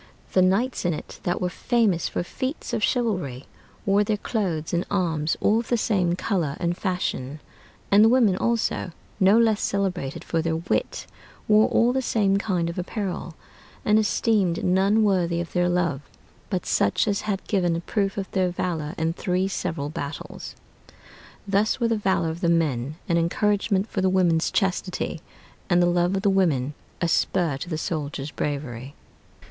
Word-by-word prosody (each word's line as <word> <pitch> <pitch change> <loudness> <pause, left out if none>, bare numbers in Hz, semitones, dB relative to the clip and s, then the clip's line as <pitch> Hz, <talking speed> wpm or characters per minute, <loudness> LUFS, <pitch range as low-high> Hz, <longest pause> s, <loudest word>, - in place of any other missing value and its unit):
The 185 - +5
knights 200 +8 +1
in 175 -3 +1
it - - -9
that 175 - 0
were 180 - 0
famous 220 -6 +1
for - - -2
feats 260 - -5
of - - 0
chivalry 180 - -1 0.4
wore 200 0 +3
their 210 0 0
clothes 180 -9 -2
and 175 +1 +1
arms 165 -6 0
all 215 +2 +3
of 230 - -5
the 240 - +1
same 185 -6 +1
color 175 -7 -1
and 175 -1 0
fashion: 155 -7 -3 0.5
and 205 +2 +7
the 225 - +6
women 235 -6 +4
also, 230 -5 -1 0.3
no 195 +3 +5
less 225 -2 +3
celebrated 180 -8 -2
for 165 - -1
their 160 0 -1
wit, 165 +3 -2 0.4
wore 215 0 +5
all 240 +2 +3
the 265 - +1
same 200 -5 +2
kind 185 -5 -1
of 170 +2 -4
apparel; 180 -3 -4 0.5
and 210 +1 +4
esteemed 210 -4 +1
none 195 +4 +3
worthy 180 -4 +1
of 170 -1 -5
their 175 0 +2
love 170 -6 0 0.5
but 185 -3 -2
such 100 - +1
as 200 -1 0
had 200 -3 -3
given 175 -5 +1
a 165 - -3
proof 195 +2 -1
of 195 - -2
their 185 -2 +1
valor 165 -3 -3
in 160 0 0
three 180 +2 0
several 165 -6 -3
battles. 145 0 -6 0.9
Thus 205 +4 +1
was 235 -2 +1
the 230 - +2
valor 190 -5 +1
of 165 +2 -8
the 170 - +2
men 150 -5 0
an 170 -1 +2
encouragement 200 +3 +1
for 195 - -2
the 190 - +3
women's 175 -3 +2
chastity, 185 -4 -1 0.5
and 175 -1 +4
the 175 - +4
love 175 +1 +2
of 195 - -2
the 200 - +4
women 150 -8 +1 0.3
a 170 - +2
spur 165 -3 +1
to 175 - -7
the 160 - -2
soldiers' 150 -3 -4
bravery. 140 -2 -4
180 Hz, 175 wpm, -24 LUFS, 165-205 Hz, 0.9 s, and